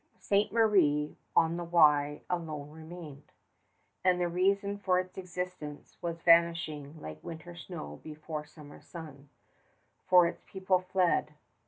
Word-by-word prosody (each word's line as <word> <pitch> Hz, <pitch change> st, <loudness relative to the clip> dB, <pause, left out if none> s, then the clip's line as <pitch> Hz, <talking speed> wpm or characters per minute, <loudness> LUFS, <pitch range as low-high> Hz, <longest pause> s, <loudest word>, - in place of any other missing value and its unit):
Ste. 200 Hz, 0 st, +1 dB
Marie 185 Hz, -10 st, +3 dB, 0.2 s
on 165 Hz, +1 st, +3 dB
the 175 Hz, -, -3 dB
Wye 150 Hz, -4 st, +4 dB
alone 155 Hz, -4 st, -4 dB
remained, 160 Hz, -2 st, -11 dB, 0.7 s
and 180 Hz, -1 st, +3 dB
the 175 Hz, -, +1 dB
reason 200 Hz, +3 st, +1 dB
for 185 Hz, -2 st, +2 dB
its 185 Hz, 0 st, -5 dB
existence 180 Hz, -5 st, -6 dB
was 170 Hz, -1 st, -4 dB
vanishing 165 Hz, -3 st, +3 dB
like 75 Hz, -, -9 dB
winter 165 Hz, +1 st, -8 dB
snow 165 Hz, -, -8 dB
before 155 Hz, 0 st, -6 dB
summer 150 Hz, -1 st, -14 dB
sun, 150 Hz, -5 st, -11 dB, 0.8 s
for 180 Hz, -1 st, +8 dB
its 170 Hz, -, -4 dB
people 190 Hz, -1 st, 0 dB
fled 180 Hz, -4 st, +1 dB
170 Hz, 130 wpm, -31 LUFS, 150-180 Hz, 0.8 s, for